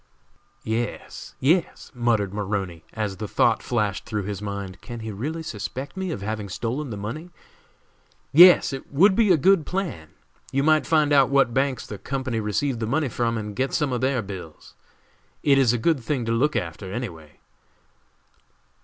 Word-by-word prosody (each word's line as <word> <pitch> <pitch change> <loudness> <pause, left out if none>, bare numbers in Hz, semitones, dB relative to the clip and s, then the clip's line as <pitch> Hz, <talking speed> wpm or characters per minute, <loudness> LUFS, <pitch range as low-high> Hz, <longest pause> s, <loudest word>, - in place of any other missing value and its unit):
"Yes! 110 +1 -4
yes!" 165 +6 +1
muttered 115 -5 0
Maroney, 95 -5 -3
as 105 -3 -3
the 105 - -4
thought 115 +2 +2
flashed 105 -6 -1
through 105 -2 -3
his 100 0 -5
mind, 100 -2 -6
"can 120 -2 -8
he 110 0 -5
really 150 +11 -4
suspect 130 - -6
me 190 -1 -3
of 100 -12 -4
having 105 -1 -4
stolen 125 +9 -3
the 105 - -5
money?" 115 - -6 1.0
"Yes, 175 0 +8
it 135 - -7
would 190 +8 +5
be 215 -3 +4
a 175 - +6
good 190 +3 +4
plan. 175 - -4 0.4
You 135 +1 +1
might 155 0 +3
find 155 -2 +3
out 135 -2 +5
what 135 -3 +3
banks 135 -1 0
the 105 - -8
company 130 -4 -3
received 115 +5 -1
the 110 - -2
money 140 +3 0
from 115 0 -1
and 105 -1 -5
get 135 +4 -1
some 145 -5 0
of 125 - -1
their 130 -3 +1
bills! 95 -6 -9 0.7
It 140 -1 +5
is 130 -4 +4
a 120 - +1
good 155 +6 +1
thing 125 0 -2
to 115 - -1
look 145 +6 +1
after, 90 +3 -4
any 120 +2 -3
way." 80 -3 -15
120 Hz, 180 wpm, -24 LUFS, 105-145 Hz, 1.0 s, Yes